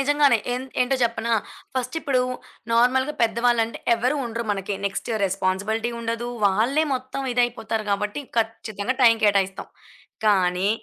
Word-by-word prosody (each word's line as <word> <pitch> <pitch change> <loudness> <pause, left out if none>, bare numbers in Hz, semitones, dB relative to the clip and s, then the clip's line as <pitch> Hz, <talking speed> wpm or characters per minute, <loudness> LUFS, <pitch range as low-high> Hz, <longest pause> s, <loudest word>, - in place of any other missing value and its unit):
నిజంగానే. 285 -3 +4 0.2
ఏంద్ 260 +1 -5
ఏంటో 265 +2 +1
జెప్పనా, 235 0 0 0.4
ఫస్టిప్పుడు 260 +1 0 0.5
నార్మల్‌గా 260 +5 +3
పెద్ద 225 0 +2
వాళ్ళంటే 230 -1 +2 0.2
ఎవరు 250 +5 0
ఉండరు. 230 0 -4
మనకి 195 0 -3
నెక్స్ట్ 200 +4 -4
రెస్‌పాన్‌సిబిలిటీ 200 +5 -1
ఉండదు. 230 +1 -3 0.2
వాళ్ళే 240 +11 +2
మొత్తం 260 +1 -4
ఇదయిపోతారు 225 -3 0
గాబట్టి 210 +7 -1 0.2
ఖచ్చితంగా 225 +1 -2
టైం 230 -2 +7
కేటాయిస్తాం. 195 -2 +1 0.6
కానీ 185 -2 +3
230 Hz, 120 wpm, -23 LUFS, 205-255 Hz, 0.6 s, టైం